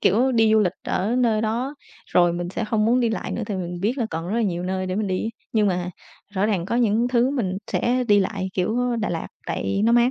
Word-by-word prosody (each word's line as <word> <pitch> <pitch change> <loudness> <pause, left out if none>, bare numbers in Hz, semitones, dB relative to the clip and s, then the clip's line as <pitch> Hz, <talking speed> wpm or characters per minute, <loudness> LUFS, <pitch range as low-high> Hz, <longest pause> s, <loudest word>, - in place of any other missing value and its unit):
Kiểu 250 +7 +3
đi 225 -2 +4
du 220 - +5
lịch 180 -4 +2
ở 215 +6 -1
nơi 230 -4 +2
đó 240 +6 -1 0.3
rồi 175 -1 +3
mình 175 0 -3
sẽ 215 - -2
không 215 0 +1
muốn 245 +3 +3
đi 235 - +2
lại 220 - -3
nữa 235 - -3
tại 205 - -3
mình 175 -1 -4
biết 235 +7 0
là 230 - 0
còn 165 +2 -4
rất 210 - -1
là 235 - +2
nhiều 175 -4 -1
nơi 185 0 -2
để 185 - -2
mình 215 -1 0
đi, 190 +4 -1 0.2
nhưng 215 -2 +3
mà 180 -1 -1 0.4
rõ 195 +2 +2
ràng 190 -5 0
có 235 - 0
những 235 0 +2
thứ 250 +1 +2
mình 190 -9 -1
sẽ 250 +1 +1
đi 205 -1 +6
lại 190 0 -2
kiểu, 205 +6 0
ơ, 245 -1 0
Đà 220 -2 -1
Lạt 165 - -3 0.2
tại 200 - -1
nó 230 - +4
mát, 240 +1 +5
215 Hz, 265 wpm, -23 LUFS, 185-235 Hz, 0.4 s, đi